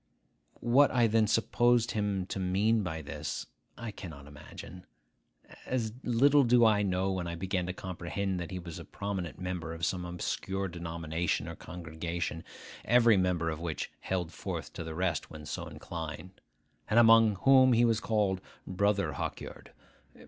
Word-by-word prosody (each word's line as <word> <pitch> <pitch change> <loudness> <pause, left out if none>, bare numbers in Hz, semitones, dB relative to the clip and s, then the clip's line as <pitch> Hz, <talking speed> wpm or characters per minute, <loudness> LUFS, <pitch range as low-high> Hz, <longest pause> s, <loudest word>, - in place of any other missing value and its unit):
What 135 +4 +5
I 120 -2 +3
then 110 -1 +3
supposed 120 +2 +3
him 100 -3 -1
to 95 - -4
mean 100 +5 +2
by 80 -4 -4
this, 75 0 -5 0.3
I 115 0 -5
cannot 80 -8 -9
imagine. 75 +5 -11 0.8
As 115 -4 -1
little 140 +4 +5
do 120 -1 +5
I 105 -2 +4
know 95 -1 0
when 90 -2 -2
I 85 - -4
began 90 0 -2
to 90 - -2
comprehend 95 +1 -3
that 85 - -5
he 95 - -5
was 85 -2 -7
a - - -7
prominent 95 -5 -5
member 90 -3 -4
of 85 0 -2
some 90 -2 -1
obscure 95 +2 -3
denomination 85 -1 -2
or - - -6
congregation, 85 -1 -5 0.4
every 120 -1 +5
member 90 -3 +1
of 80 - -5
which 85 -2 -4
held 90 -3 -3
forth - - -5
to - - -5
the 80 -1 -6
rest 90 -3 -1
when 75 -1 -10
so 75 - -5
inclined, 80 +2 -7 0.5
and 110 - +2
among 115 -2 +7
whom 130 -1 +7
he 120 +1 +5
was 115 -2 +2
called 105 -4 0 0.2
Brother 100 +2 +1
Hawkyard. - - -6
95 Hz, 160 wpm, -30 LUFS, 85-110 Hz, 0.8 s, among